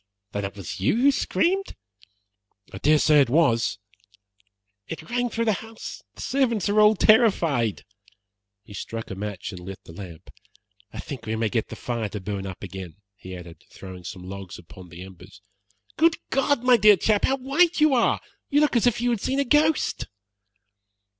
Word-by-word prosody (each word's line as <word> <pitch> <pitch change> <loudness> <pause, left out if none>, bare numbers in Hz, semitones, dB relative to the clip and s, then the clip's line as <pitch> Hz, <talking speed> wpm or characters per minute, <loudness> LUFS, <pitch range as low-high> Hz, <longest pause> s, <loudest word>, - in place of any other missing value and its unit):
"Then 100 -1 -3
it 100 - -6
was 100 -3 -7
you 95 - +2
who 280 +3 +5
screamed?" 375 +7 0 1.0
"I 95 - -7
dare 150 +6 +4
say 150 -1 +5
it 135 - +2
was." 120 -5 +2 1.1
"It 165 - -7
rang 245 0 0
through 230 0 -2
the 220 - +3
house. 225 0 -9
The - - -10
servants 240 -7 0
are 210 +1 +4
all 210 +1 +6
terrified." 170 - +3 0.8
He 105 - -14
struck 115 +3 -6
a - - -4
match 100 -1 -5
and 90 - -8
lit 95 +2 -8
the 80 - -13
lamp. 85 -2 -10 0.6
"I - - -10
think 125 -4 -7
we 110 - -1
may 110 -1 0
get 115 0 -1
the - - -8
fire 115 -3 -3
to 105 - -5
burn 100 0 -5
up 95 0 -8
again," 95 -3 -8 0.2
he 95 -2 -9
added, 85 -2 -11
throwing 95 -1 -10
some 90 +1 -8
logs 95 -1 -8
upon 90 +1 -14
the 85 +1 -10
embers. 95 +1 -14 0.6
"Good 330 +1 +4
God, 270 -1 +1
my 250 -1 +6
dear 210 -1 +6
chap, 210 +3 +2
how 270 - +1
white 305 +7 +2
you 305 -2 +5
are! 240 -3 +2 0.3
You 290 +1 +3
look 300 -3 +2
as 235 +1 +3
if 240 -1 +1
you 245 0 +1
had 230 -4 -1
seen 270 +1 -1
a 280 - +1
ghost." 300 +4 +2
130 Hz, 185 wpm, -24 LUFS, -, 1.1 s, all